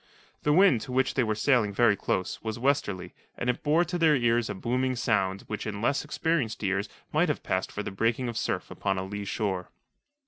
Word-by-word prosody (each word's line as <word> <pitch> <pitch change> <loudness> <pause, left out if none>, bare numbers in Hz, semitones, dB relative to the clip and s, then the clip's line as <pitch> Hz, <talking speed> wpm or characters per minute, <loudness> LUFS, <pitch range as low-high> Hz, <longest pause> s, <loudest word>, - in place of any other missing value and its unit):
The 150 - +2
wind, 160 - +5
to 130 - -7
which 130 +1 +1
they 130 - +2
were 110 -2 0
sailing 110 -2 +2
very 115 -3 +5
close, 95 -1 -2
was 110 0 -4
westerly, 115 -8 0 0.2
and 125 - +1
it - - -9
bore 160 +4 +3
to 175 0 -3
their 160 -2 +5
ears 120 -2 +2
a - - -3
booming 130 +5 0
sound 100 -5 0
which 105 0 -5
in 100 -1 -4
less 140 +6 +1
experienced 150 -7 -1
ears 100 +1 0 0.2
might 160 +2 +3
have 150 - -2
passed 95 0 -1
for 105 - -4
the - - -5
breaking 115 +5 0
of 120 - -4
surf - - -2
upon 95 - -1
a 95 - -2
lee 100 +1 -5
shore. 95 -3 -2
115 Hz, 215 wpm, -28 LUFS, 100-140 Hz, 0.2 s, wind